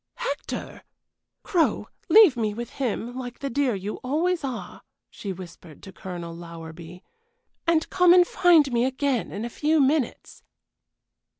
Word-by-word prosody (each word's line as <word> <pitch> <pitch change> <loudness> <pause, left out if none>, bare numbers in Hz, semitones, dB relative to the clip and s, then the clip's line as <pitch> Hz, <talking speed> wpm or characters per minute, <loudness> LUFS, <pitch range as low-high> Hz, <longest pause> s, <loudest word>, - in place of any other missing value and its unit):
"Hector! - - -5 0.6
Crow, 340 -4 +1 0.2
leave 415 -11 +7
me 215 -3 -1
with 240 +1 -6
him, 245 -2 -3
like 245 -2 -6
the 275 - -5
dear 265 -3 +1
you 200 +2 -5
always 325 +6 -1
are," 255 -4 -6 0.3
she 200 - -6
whispered 175 -4 -11
to 190 - -10
Colonel 175 -2 -7
Lowerby, 170 +1 -10 0.6
"and 330 -1 +2
come 360 -1 +5
and 360 0 +7
find 345 -7 +4
me 235 0 +2
again 265 -2 -1
in 210 +3 -4
a - - -2
few 305 +6 +1
minutes." 280 -2 0
250 Hz, 140 wpm, -25 LUFS, 195-315 Hz, 0.6 s, leave